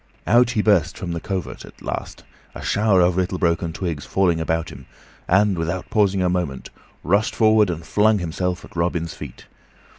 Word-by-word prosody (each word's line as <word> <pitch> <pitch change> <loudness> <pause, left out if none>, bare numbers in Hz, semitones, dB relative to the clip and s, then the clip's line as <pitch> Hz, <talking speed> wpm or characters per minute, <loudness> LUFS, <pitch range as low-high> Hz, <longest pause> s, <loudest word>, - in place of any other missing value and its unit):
Out 120 +6 +4
he 105 - +2
burst 90 -6 +2
from 90 -6 -5
the 85 - -3
covert, 95 0 -5
at - - -15
last, - - -6 0.3
a - - -8
shower 105 -3 +3
of 90 0 +3
little 95 0 0
broken 85 -2 0
twigs 80 -4 -4
falling 85 -4 +1
about 80 +1 -1
him, 65 -2 -12 0.4
and, 95 -1 +3
without 85 +2 -3
pausing 100 -3 +2
a - - +2
moment, 90 -7 -3 0.3
rushed 100 +6 +1
forward 110 -2 +4
and 85 -1 -4
flung 105 +3 +3
himself 90 +1 -3
at - - -18
Robin's 85 -1 -1
feet. - - -10
90 Hz, 180 wpm, -22 LUFS, 85-100 Hz, 0.4 s, Out